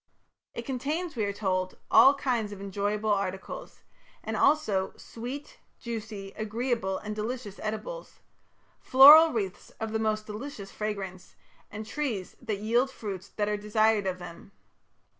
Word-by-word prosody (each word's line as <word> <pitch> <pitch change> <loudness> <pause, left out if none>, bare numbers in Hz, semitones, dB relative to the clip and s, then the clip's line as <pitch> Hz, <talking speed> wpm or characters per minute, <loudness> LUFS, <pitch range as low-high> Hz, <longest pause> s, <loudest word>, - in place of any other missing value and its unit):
It 235 - -5
contains, 300 +6 -3
we 220 -3 0
are 200 - -1
told, 185 -2 -2
"all 275 +2 +8
kinds 245 -7 -1
of 200 - -8
enjoyable 205 +2 -1
articles", 195 - -4 0.4
and - - -3
also 215 -11 +2
"sweet, 255 +5 -8 0.2
juicy, 215 -4 -6
agreeable 220 -2 -1
and 210 0 -6
delicious 215 -1 -5
edibles... 220 - -5 0.6
floral 300 +5 +9
wreaths 200 -5 -3
of 220 -1 -3
the 220 - 0
most 215 -1 0
delicious 210 -2 -7
fragrance, 195 -4 -5 0.3
and 215 +1 -7
trees 225 -7 -3
that 220 -4 -2
yield 240 +5 +2
fruits 200 -8 -7
that 205 -1 -2
are 210 0 0
desired 210 0 +2
of 185 -1 -1
them". 175 +2 -11
215 Hz, 140 wpm, -28 LUFS, 200-245 Hz, 0.6 s, floral